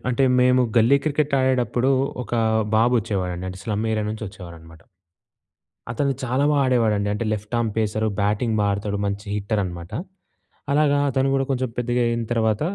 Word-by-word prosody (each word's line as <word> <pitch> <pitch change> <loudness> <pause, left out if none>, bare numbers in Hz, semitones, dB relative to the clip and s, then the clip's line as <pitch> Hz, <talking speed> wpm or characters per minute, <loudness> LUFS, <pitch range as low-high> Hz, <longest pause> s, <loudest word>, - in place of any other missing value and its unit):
అంటే 125 +2 +1 0.2
మేము 125 0 +4 0.2
గల్లీ 120 +5 +5
క్రికెట్ 150 -1 0
ఆడేడప్పుడు, 130 -1 +1 0.3
ఒక - - -12 0.4
బాబు 115 +3 +3
వచ్చేవాడండి 95 -5 -3
అంటే 95 0 -7
స్లమ్ 110 -1 -2
ఏరియా 110 -1 0
నుంచి 110 0 -5
వచ్చేవారనమాట. 85 -4 -12 1.1
అతను 135 +4 0
చాలా 130 +3 0
బాగా 145 -2 +3
ఆడేవాడండి 110 -5 +2
అంటే, 105 +3 -2
లెఫ్ట్ 105 +2 -5
ఆర్మ్ 115 -2 0
పేసర్, 110 0 0
బ్యాటింగ్ 105 +3 0
బాగా 100 0 +2
ఆడుతాడు 100 0 -3
మంచి 100 +2 -4
హిట్టర్ 105 +1 -1
అనమాట. 85 -1 -7 0.8
అలాగా 145 -1 +3
అతను 135 +1 +1
గూడా 135 0 +1
కొంచెం 130 -2 -1
పెద్దగా 120 0 0
అయిన 115 0 -1
తర్వాత, 110 -1 +1
110 Hz, 160 wpm, -22 LUFS, 100-125 Hz, 1.1 s, గల్లీ